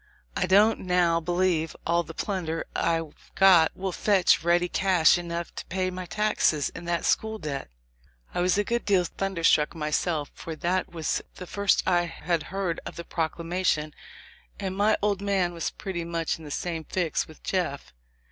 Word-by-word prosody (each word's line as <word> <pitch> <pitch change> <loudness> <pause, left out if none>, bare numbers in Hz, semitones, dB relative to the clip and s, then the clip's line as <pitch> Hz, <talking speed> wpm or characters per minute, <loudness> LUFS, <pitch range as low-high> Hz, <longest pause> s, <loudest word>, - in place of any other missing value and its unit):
I 180 - 0
don't 205 +4 +5
now 180 -2 +2
believe 175 -1 0
all 170 +1 +2
the 165 -1 -10
plunder 170 -5 -2
I've 165 -2 -2
got 185 -4 +6
will 190 0 -2
fetch 190 -2 +3
ready 175 +1 +3
cash 180 -3 +4
enough 170 -1 -4
to - - -7
pay 185 0 -1
my 185 0 -6
taxes 175 -6 +1
and 170 +1 -8
that 170 0 -1
school 220 0 +1
debt." 140 - -5 0.6
I - - 0
was 180 +2 +2
a 205 - +3
good 235 +3 -1
deal 195 -3 +3
thunderstruck 170 -4 +1
myself; 155 0 -1
for 165 - -7
that 180 +3 -1
was 165 -3 -1
the 180 - -8
first 200 +2 +1
I 175 -2 +3
had 170 0 -2
heard 190 -3 -2
of - - -8
the 170 - -6
proclamation, 165 -1 -1 0.7
and 190 -2 -3
my 205 +2 +3
old 200 -2 +1
man 195 -3 +1
was 170 - -2
pretty 185 -4 -5
much 165 -1 -2
in 160 - -11
the - - -8
same 165 +2 -3
fix 170 -1 -1
with 155 - -16
Jeff. 140 - -2
175 Hz, 175 wpm, -26 LUFS, 165-190 Hz, 0.7 s, got